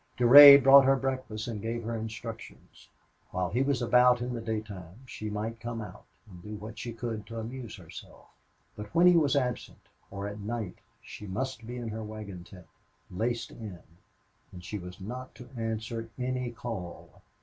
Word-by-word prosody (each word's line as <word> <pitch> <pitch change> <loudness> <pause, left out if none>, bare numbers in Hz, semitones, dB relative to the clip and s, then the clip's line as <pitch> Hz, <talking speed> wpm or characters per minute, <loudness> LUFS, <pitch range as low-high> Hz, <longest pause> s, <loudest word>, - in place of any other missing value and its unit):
Durade 140 +3 +10
brought 135 0 +8
her 135 +1 +5
breakfast 130 -5 -3
and 110 -4 -5
gave 115 +2 -3
her 115 +1 -3
instructions. 110 +1 -9 0.4
While 90 -2 -2
he 125 - +1
was 135 -2 0
about 125 +1 +5
in 125 +1 -4
the 120 - -4
daytime 105 -3 -6
she 110 -4 -6
might 110 +2 -4
come 115 0 -5
out 105 - -9 0.2
and 90 -4 -13
do 105 +4 -8
what 105 +1 -9
she 120 - -5
could 115 -2 -5
to 115 - -8
amuse 115 -1 -7
herself; - - -13 0.5
but 105 0 -9
when 170 +2 +5
he 180 0 +7
was 150 -4 +3
absent 125 -3 -3 0.2
or 100 0 -5
at 105 +1 -7
night 105 -2 -5 0.2
she 105 - -10
must 115 +4 -4
be 125 +1 -6
in 120 -2 -5
her 110 +1 -5
wagon 105 -4 -8
tent, 90 -1 -14 0.5
laced 115 +5 -2
in, 105 -6 -9 0.7
and 90 -2 -11
she 105 - -5
was 90 0 -10
not 125 +5 -8
to 120 +2 -13
answer 115 0 -4
any 125 -1 -2
call. 115 -8 -8
115 Hz, 180 wpm, -29 LUFS, 105-125 Hz, 0.7 s, Durade